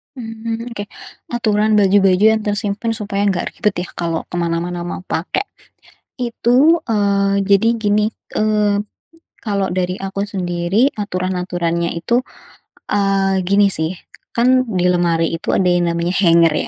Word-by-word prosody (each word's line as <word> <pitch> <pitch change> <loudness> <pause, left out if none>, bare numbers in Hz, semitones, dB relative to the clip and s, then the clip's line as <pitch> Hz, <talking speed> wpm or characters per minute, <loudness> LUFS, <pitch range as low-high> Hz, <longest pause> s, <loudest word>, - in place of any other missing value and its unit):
Mmm, 230 0 -5
oke. 205 -3 -6 0.5
Aturan 215 -2 +1
baju-baju 195 -1 +4
yang - - -6
tersimpan 210 +2 -1
supaya 205 -2 -2
enggak 190 -3 0
ribet, 210 -4 -1
ya, 180 - -6
kalau 165 -1 -1
ke - - -6
mana-mana 170 +1 -2
mau 175 - -5
pakai. 180 - -2 0.7
Itu, 250 +6 +3
eee, 200 -2 +1
jadi 200 +4 +3
gini, 210 -1 +1 0.2
eee, 210 -1 +1 0.6
kalau 200 -3 -2
dari 180 0 -1
aku 195 +1 -4
sendiri, 185 +5 0
aturan-aturannya 180 -3 -2
itu, 205 +9 0 0.7
eee, 195 -2 +1
gini, 200 +2 +4
sih, 160 -3 -1 0.4
kan, 255 +2 +3
di 180 -4 +1
lemari 170 -2 +2
itu - - -3
ada 185 - +2
yang 175 -1 +2
namanya 170 +2 -1
hanger, 165 -2 +5
200 Hz, 135 wpm, -18 LUFS, 175-215 Hz, 0.7 s, hanger